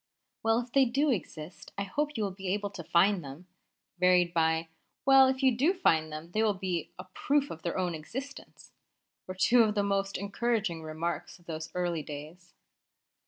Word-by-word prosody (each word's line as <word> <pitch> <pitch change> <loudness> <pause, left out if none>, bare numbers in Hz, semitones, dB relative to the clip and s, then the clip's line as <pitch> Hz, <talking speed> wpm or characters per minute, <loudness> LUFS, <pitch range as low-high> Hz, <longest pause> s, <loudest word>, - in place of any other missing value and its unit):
"Well, 225 +1 +2
if 240 0 -11
they 270 0 +5
do 275 +4 +1
exist, 175 -6 -6
I 200 - -1
hope 295 +10 -2
you 220 - 0
will 200 - -1
be 190 0 -8
able 205 +2 -1
to 180 -4 -8
find 180 +3 +3
them!" 140 +6 -10 0.5
varied 180 -1 +4
by, 160 0 +1 0.4
"Well, 270 -1 +7
if 260 +1 -1
you 260 -3 +4
do 305 +11 +2
find 160 - +2
them, 155 +3 -8
they 215 - 0
will 215 -2 +2
be 180 -4 -3
a 185 - -7
proof 280 +10 0
of 160 - -8
their 170 - -3
own 180 -2 0
existence!" 260 - -8 0.6
were 185 - -6
two 190 +6 +5
of 215 -2 +2
the 205 - +2
most 195 0 -1
encouraging 200 -3 -1
remarks 160 +4 -4
of 175 - -25
those 160 -1 -5
early 175 -3 -1
days. 155 +5 -10
185 Hz, 190 wpm, -30 LUFS, 170-230 Hz, 0.6 s, Well